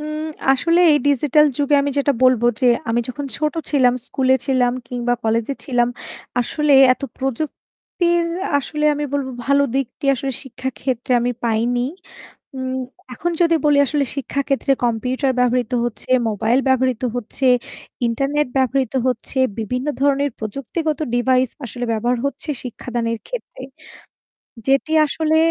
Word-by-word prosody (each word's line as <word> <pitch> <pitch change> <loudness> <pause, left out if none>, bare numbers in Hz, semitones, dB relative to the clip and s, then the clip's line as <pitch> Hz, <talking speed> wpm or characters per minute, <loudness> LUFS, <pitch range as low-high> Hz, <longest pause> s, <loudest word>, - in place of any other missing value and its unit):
উম 305 +1 -4 0.3
আসলে 335 +6 +2
এই 295 - +4
ডিজিটাল 295 +2 +4
যুগে 290 0 +2
আমি 285 - -1
যেটা 280 0 +2
বলবো 245 -2 +4
যে 255 - +3 0.2
আমি 235 +1 +2
যখন 280 +3 -5
ছোটো 305 +1 -1
ছিলাম, 255 -4 +4
স্কুলে 260 -1 +2
ছিলাম 250 -2 +2 0.2
কিংবা 245 -1 -1
কলেজে 230 +4 0
ছিলাম। 245 -2 +1 0.5
আসলে 300 +4 0 0.2
এত 255 - -7 0.2
প্রযুক্তির 315 +5 -2 0.3
আসলে 300 +2 -3
আমি 295 0 -2
বলবো 275 -2 -1 0.2
ভালো 280 0 +4
দিকটি 270 +2 -3
আসলে 270 +1 -3
শিক্ষাক্ষেত্রে 255 0 -4
আমি 245 +1 0
পাইনি। 235 +2 +1 0.8
উম 260 0 -3 0.4
এখন 345 +8 -2
যদি 335 -1 +4
বলি 295 -1 +4
আসলে 285 +1 0
শিক্ষাক্ষেত্রে 275 0 0
কম্পিউটার 255 +3 0
ব্যবহৃত 250 -1 +1
হচ্ছে, 240 +1 -5 0.2
মোবাইল 220 +4 +1
ব্যবহৃত 260 -2 +1
হচ্ছে, 245 +3 -3 0.6
ইন্টারনেট 275 +5 0
ব্যবহৃত 260 -2 +1
হচ্ছে, 255 +2 -2 0.2
বিভিন্ন 250 +5 -3
ধরনের 280 0 +2
প্রযুক্তিগত 275 - -3 0.2
ডিভাইস 255 +1 +2 0.2
আসলে 245 +1 -5
ব্যবহার 240 +2 0
হচ্ছে 280 +3 -3
শিক্ষাদানের 235 -2 -3
ক্ষেত্রে। - - -7 1.1
যেটি 275 +3 +2
আসলে 315 +2 0
260 Hz, 130 wpm, -20 LUFS, 245-285 Hz, 1.1 s, এই